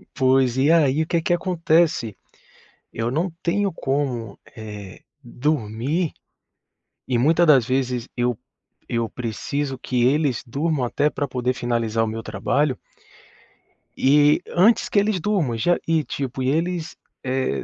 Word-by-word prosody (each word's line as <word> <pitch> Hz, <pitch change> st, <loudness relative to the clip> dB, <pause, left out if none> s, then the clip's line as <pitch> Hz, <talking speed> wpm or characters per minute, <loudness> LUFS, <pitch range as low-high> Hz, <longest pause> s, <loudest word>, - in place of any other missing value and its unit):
Pois 130 Hz, -2 st, +3 dB
e 140 Hz, +4 st, +3 dB
aí 155 Hz, -2 st, +3 dB
o -, -, -8 dB
que 170 Hz, -1 st, +1 dB
que 175 Hz, -, +1 dB
acontece, 165 Hz, -, +1 dB, 0.7 s
eu 115 Hz, +2 st, -2 dB
não 170 Hz, +5 st, -1 dB
tenho 195 Hz, +3 st, +1 dB
como, 135 Hz, -8 st, -3 dB, 0.2 s
eh, 105 Hz, -4 st, -9 dB, 0.2 s
dormir. 135 Hz, -, -1 dB, 1.0 s
E 125 Hz, -2 st, +1 dB
muita 160 Hz, +7 st, +4 dB
das 135 Hz, -7 st, +5 dB
vezes 130 Hz, -2 st, -1 dB
eu 120 Hz, -2 st, 0 dB, 0.5 s
eu 115 Hz, -2 st, -1 dB
preciso 130 Hz, +3 st, -3 dB
que 125 Hz, -2 st, -1 dB
eles 140 Hz, 0 st, +1 dB
durmam 145 Hz, +2 st, -1 dB
até 145 Hz, +5 st, +1 dB
pra 145 Hz, -, -3 dB
poder 125 Hz, 0 st, -1 dB
finalizar 115 Hz, -2 st, -1 dB
o -, -, -1 dB
meu 115 Hz, +1 st, -4 dB
trabalho 125 Hz, +7 st, -1 dB, 1.2 s
e 145 Hz, +2 st, +4 dB
antes 210 Hz, +7 st, +4 dB
que 200 Hz, -, +3 dB
eles 205 Hz, -2 st, +1 dB
durmam 165 Hz, -, 0 dB
já 175 Hz, +10 st, +2 dB
e 160 Hz, -2 st, +2 dB
tipo, 135 Hz, -2 st, -4 dB
eles, 165 Hz, +4 st, -1 dB, 0.3 s
eh, 130 Hz, -, -1 dB
135 Hz, 135 wpm, -22 LUFS, 120-160 Hz, 1.2 s, das